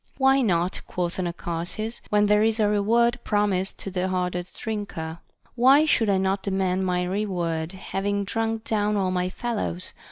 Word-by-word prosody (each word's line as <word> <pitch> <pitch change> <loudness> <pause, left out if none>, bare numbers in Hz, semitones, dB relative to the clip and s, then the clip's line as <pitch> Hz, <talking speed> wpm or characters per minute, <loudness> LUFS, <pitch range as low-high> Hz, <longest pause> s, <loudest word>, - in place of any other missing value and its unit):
Why 270 0 +4
not, 180 -5 0
quoth 180 0 -3
Anacharsis, 175 +5 -3
when 210 0 +3
there 210 0 +4
is 220 +1 +2
a 210 - +4
reward 230 +4 +2
promised 205 -3 0
to 195 - -5
the 185 0 -1
hardest 180 -1 -3
drinker? 185 -7 -4 0.3
Why 265 +5 +6
should 225 -8 +2
I 195 - +3
not 190 +1 0
demand 190 -1 0
my 180 0 +1
reward, 180 -4 -2
having 200 +1 -2
drunk 225 +1 -2
down 210 -1 0
all 190 -2 +1
my 180 0 0
fellows 205 -5 -3
195 Hz, 160 wpm, -25 LUFS, 180-215 Hz, 0.3 s, Why